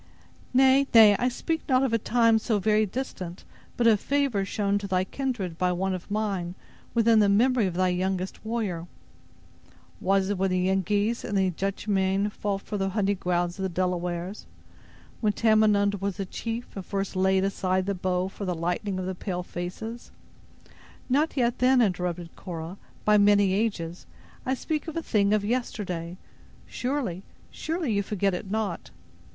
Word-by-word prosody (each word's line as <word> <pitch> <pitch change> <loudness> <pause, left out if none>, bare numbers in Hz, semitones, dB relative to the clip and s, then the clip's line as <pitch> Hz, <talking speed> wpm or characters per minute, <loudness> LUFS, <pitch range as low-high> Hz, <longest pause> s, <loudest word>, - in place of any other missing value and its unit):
"Nay, 265 +2 +5
nay; 215 -2 +9
I 250 - +2
speak 320 +6 -2
not 260 0 +4
of 260 -4 0
a 230 - +3
time 230 0 +3
so 220 -1 0
very 215 +1 +2
distant, 185 -6 -5 0.3
but 240 - +1
of 220 -3 +5
favor 275 -7 0
shown 200 +1 0
to 200 - -5
thy 185 -1 +1
kindred 200 -7 -3
by 180 0 +2
one 190 +2 -1
of 185 +1 -6
mine, 200 -4 -2 0.4
within 230 -1 +5
the 205 -1 +4
memory 235 +1 +3
of 175 - -4
thy 185 0 +2
youngest 185 +1 -2
warrior." 210 -7 -3 1.1
"Was 195 +1 +2
it 205 -2 -1
when 195 0 +2
the 185 - +1
Yengeese 205 +4 +1
and 205 - -2
the 190 -1 +2
Dutchmanne 195 +1 0
fought 200 -1 -3
for 210 - -4
the 195 0 0
hunting 200 0 0
grounds 175 0 -1
of - - -3
the 190 - 0
Delawares? 180 +1 -2 0.7
Then 210 -2 +2
Tamenund 210 -3 +3
was 200 0 -2
a 195 - -1
chief, 230 +5 -5
and 195 - -5
first 195 0 -3
laid 190 0 +3
aside 185 -1 0
the 200 - 0
bow 185 0 -1
for 195 - -8
the 180 -2 -1
lightning 180 +4 -2
of 185 - -3
the 190 - -2
pale 180 -1 -4
faces—" 200 +7 -6 1.0
"Not 290 +4 +1
yet 240 -1 +1
then," 255 +1 +4
interrupted 180 -5 -1
Cora, 170 +1 -7 0.3
"by 210 0 +5
many 205 -1 +4
ages; 190 -5 -2 0.4
I 260 - +2
speak 305 +4 -3
of 320 - -5
a 330 - -2
thing 205 -2 +2
of 210 -1 +2
yesterday. 185 -7 -3 0.5
Surely, 250 -9 -3 0.3
surely, 320 -6 -2
you 200 - +2
forget 200 -1 0
it 180 +2 -5
not." 210 -4 -2
200 Hz, 170 wpm, -26 LUFS, 185-225 Hz, 1.1 s, nay